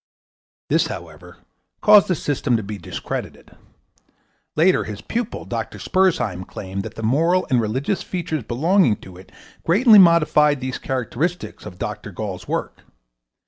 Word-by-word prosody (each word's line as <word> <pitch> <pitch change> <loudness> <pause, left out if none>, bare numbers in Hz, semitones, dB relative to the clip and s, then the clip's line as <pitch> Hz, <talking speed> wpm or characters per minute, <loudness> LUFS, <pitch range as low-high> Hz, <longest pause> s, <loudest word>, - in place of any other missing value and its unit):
This, - - +2
however, - - -9 0.4
caused 210 -1 +7
the 180 - +1
system 140 -5 0
to 110 - -4
be 100 0 -6
discredited. - - -6 1.0
Later 180 +4 +3
his 105 -2 -7
pupil, 235 0 -4
Dr. - - -5
Spurzheim, 125 - 0
claimed 95 0 -6
that 110 +2 -8
the 115 - -7
moral 165 +10 +2
and 125 -2 +4
religious 130 - -1
features 165 -5 -3
belonging 140 - +2
to 95 - -12
it 95 +1 -15 0.3
greatly 210 +5 +6
modified 150 -5 +5
these 130 0 -4
characteristics 135 +7 -3
of 90 - -10
Dr. - - -5
Gall's - - -6
work. - - -4
145 Hz, 140 wpm, -21 LUFS, 110-180 Hz, 1.0 s, caused